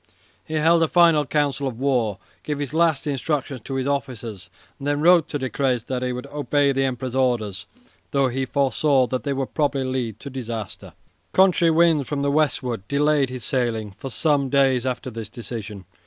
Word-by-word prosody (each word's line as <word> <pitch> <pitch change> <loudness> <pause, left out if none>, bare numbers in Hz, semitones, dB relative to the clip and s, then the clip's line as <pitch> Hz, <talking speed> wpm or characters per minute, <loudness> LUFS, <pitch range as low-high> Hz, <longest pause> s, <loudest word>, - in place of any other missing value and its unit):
He 160 - -6
held 165 +2 +4
a 165 - +4
final 165 -4 +4
council 145 -1 0
of 120 -4 -5
war, 125 -7 +1 0.2
gave 150 +9 -3
his 145 0 -4
last 160 -3 +2
instructions 140 -2 -2
to 135 - -4
his 130 -1 -1
officers, 125 -7 -4 0.3
and 140 - -5
then 145 0 +1
wrote 170 0 +5
to - - -3
Decrès 130 -3 -1
that 125 -1 -3
he 125 0 -1
would 125 0 -5
obey 145 -1 +1
the 135 0 +1
Emperor's 130 -1 -3
orders, 120 -8 0 0.4
though 140 -1 +2
he 130 +1 -2
foresaw 135 0 +2
that 130 0 -3
they 140 - -1
would 135 -1 -3
probably 145 -3 0
lead 125 -5 -3
to 140 - -7
disaster. 115 -5 -6 0.4
Contrary 185 -3 +4
winds 160 -3 +3
from 140 -1 -1
the 140 - +1
westward 135 -6 0
delayed 145 -1 +2
his 125 -2 -6
sailing 115 -6 -1
for 135 - -7
some 145 0 +1
days 130 -2 +2
after 125 0 -3
this 110 -2 -7
decision. 110 -4 -7
135 Hz, 185 wpm, -23 LUFS, 125-145 Hz, 0.4 s, wrote